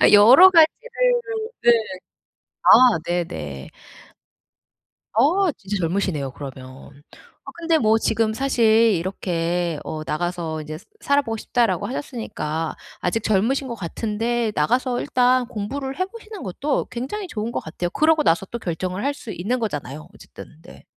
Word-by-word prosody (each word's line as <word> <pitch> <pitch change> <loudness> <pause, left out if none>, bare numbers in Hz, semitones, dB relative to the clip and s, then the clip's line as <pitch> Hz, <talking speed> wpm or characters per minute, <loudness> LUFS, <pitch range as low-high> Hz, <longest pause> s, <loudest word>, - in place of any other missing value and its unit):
아 - - +6
여러 250 - +9
가지를 480 +8 +3 0.4
네 240 - +6 0.9
아. - - +4 0.4
네네. 80 - -4 1.4
어. 335 - +3
진짜 205 -4 -6
젊으시네요, 165 -6 -1
그러면. 135 +1 -11 0.4
아 - - -6
근데 330 -1 +2
뭐 220 -3 +3
지금 225 0 0
사실 250 0 0 0.3
이렇게 175 -2 -2
어 155 -1 -5
"나가서 165 -1 -3
이제 155 +1 -7 0.2
살아보고 280 -6 +1
싶다."라고 205 -5 0
하셨으니까 185 - -4 0.3
아직 205 +5 -1
젊으신 235 +7 +1
것 235 - -4
같은데 225 +4 -2
나가서 245 - +1
일단 250 0 +2
공부를 265 - -5
해보시는 430 +1 -6
것도 275 +10 -2
굉장히 345 - -5
좋은 220 -2 -4
것 - - -2
같아요. 175 +2 -5
그러고 310 +5 +3
나서 170 - +2
또 235 - -4
결정을 185 +2 -4
할 285 - +1
수 260 -6 -10
있는 205 +8 -2
거잖아요. 150 - -5
어쨌든. 155 - -14
네. - - -15
215 Hz, 295 characters per minute, -22 LUFS, 170-265 Hz, 1.4 s, 여러